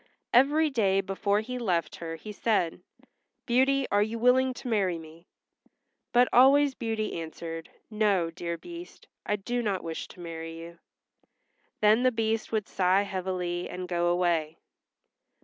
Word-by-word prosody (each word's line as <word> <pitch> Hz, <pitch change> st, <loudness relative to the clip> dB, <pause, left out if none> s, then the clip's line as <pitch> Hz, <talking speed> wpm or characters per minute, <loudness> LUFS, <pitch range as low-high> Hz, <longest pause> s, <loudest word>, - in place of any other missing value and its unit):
Every 295 Hz, +5 st, +4 dB
day 195 Hz, -6 st, +2 dB
before 200 Hz, +1 st, 0 dB
he 250 Hz, +3 st, -5 dB
left 175 Hz, -9 st, -1 dB
her 165 Hz, -1 st, -5 dB
he 210 Hz, +6 st, -9 dB
said, 200 Hz, -6 st, 0 dB, 0.6 s
"Beauty, 265 Hz, +2 st, +3 dB
are 205 Hz, -, +3 dB
you 220 Hz, +2 st, -1 dB
willing 255 Hz, +2 st, +4 dB
to 255 Hz, -, -8 dB
marry 195 Hz, -7 st, +1 dB
me?" 160 Hz, +2 st, -13 dB, 0.8 s
But 245 Hz, +1 st, +5 dB
always 275 Hz, +3 st, +6 dB
Beauty 220 Hz, -7 st, -3 dB
answered, 165 Hz, 0 st, -7 dB, 0.2 s
"No, 200 Hz, -6 st, +1 dB
dear 170 Hz, 0 st, -4 dB
Beast, 345 Hz, -, -11 dB, 0.2 s
I 210 Hz, -, +2 dB
do 240 Hz, +5 st, -2 dB
not 200 Hz, -5 st, -1 dB
wish 165 Hz, -1 st, -5 dB
to -, -, -15 dB
marry 165 Hz, -1 st, -7 dB
you." 170 Hz, +1 st, -10 dB, 1.0 s
Then 215 Hz, +2 st, +5 dB
the 255 Hz, 0 st, +4 dB
Beast 225 Hz, -1 st, -1 dB
would 215 Hz, -3 st, -1 dB
sigh 190 Hz, +1 st, +2 dB
heavily 185 Hz, -2 st, -3 dB
and 180 Hz, 0 st, -6 dB
go 175 Hz, -1 st, 0 dB
away. 170 Hz, -3 st, +1 dB
200 Hz, 150 wpm, -28 LUFS, 170-240 Hz, 1.0 s, always